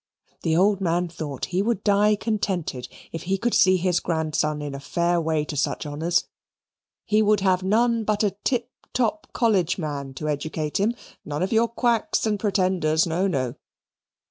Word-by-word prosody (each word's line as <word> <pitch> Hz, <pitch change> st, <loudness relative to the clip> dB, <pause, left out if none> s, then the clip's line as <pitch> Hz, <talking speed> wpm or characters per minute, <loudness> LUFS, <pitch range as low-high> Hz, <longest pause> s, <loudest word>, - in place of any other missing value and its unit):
The 160 Hz, -1 st, +1 dB
old 195 Hz, +2 st, +3 dB
man 175 Hz, 0 st, 0 dB
thought 155 Hz, -6 st, -5 dB
he 185 Hz, -, +2 dB
would 215 Hz, -1 st, -1 dB
die 210 Hz, +1 st, +4 dB
contented 195 Hz, -, -2 dB, 0.2 s
if 165 Hz, -, -5 dB
he 190 Hz, +2 st, -1 dB
could 235 Hz, +3 st, -1 dB
see 185 Hz, -1 st, +5 dB
his 180 Hz, -1 st, +1 dB
grandson 155 Hz, -2 st, -1 dB
in 145 Hz, -1 st, -5 dB
a 140 Hz, -, -5 dB
fair 170 Hz, +4 st, 0 dB
way 160 Hz, -2 st, 0 dB
to 150 Hz, -, -5 dB
such 145 Hz, -, -1 dB
honours. 160 Hz, +4 st, 0 dB, 0.8 s
He 215 Hz, 0 st, +3 dB
would 210 Hz, -1 st, +3 dB
have 185 Hz, -1 st, +2 dB
none 230 Hz, +4 st, +2 dB
but 215 Hz, 0 st, 0 dB
a 205 Hz, -, +2 dB
tip 245 Hz, -1 st, 0 dB, 0.2 s
top 255 Hz, +5 st, 0 dB
college 195 Hz, -8 st, +2 dB
man 140 Hz, -5 st, -4 dB
to 155 Hz, +3 st, -4 dB
educate 150 Hz, +2 st, -2 dB
him 220 Hz, +4 st, +1 dB, 0.3 s
none 150 Hz, +3 st, -3 dB
of 190 Hz, -, -1 dB
your 225 Hz, +1 st, +4 dB
quacks 235 Hz, -1 st, 0 dB
and 210 Hz, -2 st, 0 dB
pretenders 185 Hz, -6 st, +2 dB
no, 175 Hz, +3 st, 0 dB
no. 130 Hz, -9 st, -1 dB
185 Hz, 175 wpm, -24 LUFS, 155-210 Hz, 0.8 s, see